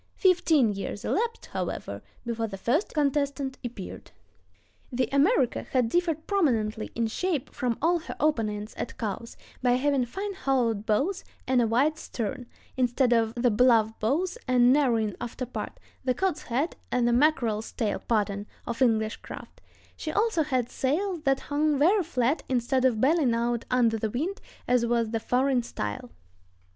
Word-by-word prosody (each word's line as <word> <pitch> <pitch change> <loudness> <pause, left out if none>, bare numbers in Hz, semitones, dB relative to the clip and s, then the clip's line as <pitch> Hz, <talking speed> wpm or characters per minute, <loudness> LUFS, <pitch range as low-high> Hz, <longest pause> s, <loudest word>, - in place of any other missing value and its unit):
Fifteen 325 - +3
years 200 +1 -5
elapsed, 460 +2 -1
however, - - -4 0.2
before 230 -1 -2
the 195 -2 -7
first 265 - 0
contestant 280 -2 0
appeared. 235 -6 -7 0.8
The 250 -1 0
America 280 - +3
had 250 -3 +3
differed 325 0 0
prominently 230 - 0
in 230 - +1
shape 305 +5 -2
from 245 -3 -1
all 345 +1 +3
her 330 - -7
opponents 215 -8 0
at - - -5
Cowes, 225 +1 -5 0.2
by 250 -1 +3
having 265 0 +2
fine 395 - -4
hollowed 245 - 0
bows 285 - +1 0.2
and 255 -1 +3
a 230 - +2
wide 280 +8 +2
stern, 245 0 -4 0.3
instead 250 0 +2
of 225 -1 +1
the 240 0 +2
bluff 220 -1 +4
bows 340 - 0
and 250 0 +5
narrowing 230 -7 +2
after 240 +2 -4
part—the 255 +1 -5
"cod's 380 -5 0
head 270 +8 -1
and 250 -1 +2
mackerel's 235 -8 +1
tail" 220 -4 -1
pattern—of 210 +2 -3
English 220 -3 +2
craft; - - -11 0.3
she 310 - -4
also 430 -2 +2
had 255 -6 0
sails 345 +6 -1
that 270 0 +2
hung 295 0 +1
very 365 +9 +4
flat 275 -3 0
instead 255 +1 +1
of 240 -4 +3
bellying 280 -4 +3
out 235 0 -1
under 235 -3 +2
the 220 - -1
wind 330 - -3 0.3
as 245 -1 +3
was 235 -1 +1
the 225 - 0
foreign 255 +2 +2
style. 105 - -5
250 Hz, 150 wpm, -27 LUFS, 230-300 Hz, 0.8 s, and